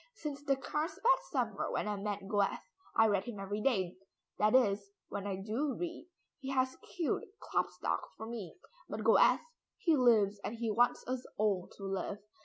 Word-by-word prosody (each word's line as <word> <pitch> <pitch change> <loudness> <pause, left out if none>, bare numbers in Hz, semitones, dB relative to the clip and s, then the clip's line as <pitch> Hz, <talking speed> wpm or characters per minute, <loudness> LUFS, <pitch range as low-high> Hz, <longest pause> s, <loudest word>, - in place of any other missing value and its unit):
"Since 290 -7 -5
the 275 - +3
Carlsbad 325 - +1
summer - - -1
when - - -1
I 210 - 0
met 200 -1 -3
Goethe, 205 -1 +2 0.4
I 225 - +6
read 200 -3 +2
him 230 -4 -6
every 205 +2 -3
day, 190 -9 +1 0.4
that 215 +3 +4
is 200 -5 +3 0.2
when 200 0 -4
I 195 - -1
do 225 +9 -1
read. 345 -1 -5 0.3
He 270 -2 -6
has 260 -1 +1 0.2
killed 335 -4 +1 0.2
Klopstock - - -1 0.2
for 220 - -6
me, 225 -6 -6 0.3
but - - -4
Goethe - - +6 0.4
he 345 -8 +3
lives 215 -6 +4
and 220 - -3
he 230 -1 -1
wants 240 +3 +3
us 255 0 -2
all 200 -4 +1
to 200 - -10
live. 195 +1 -2
220 Hz, 175 wpm, -34 LUFS, 200-270 Hz, 0.4 s, I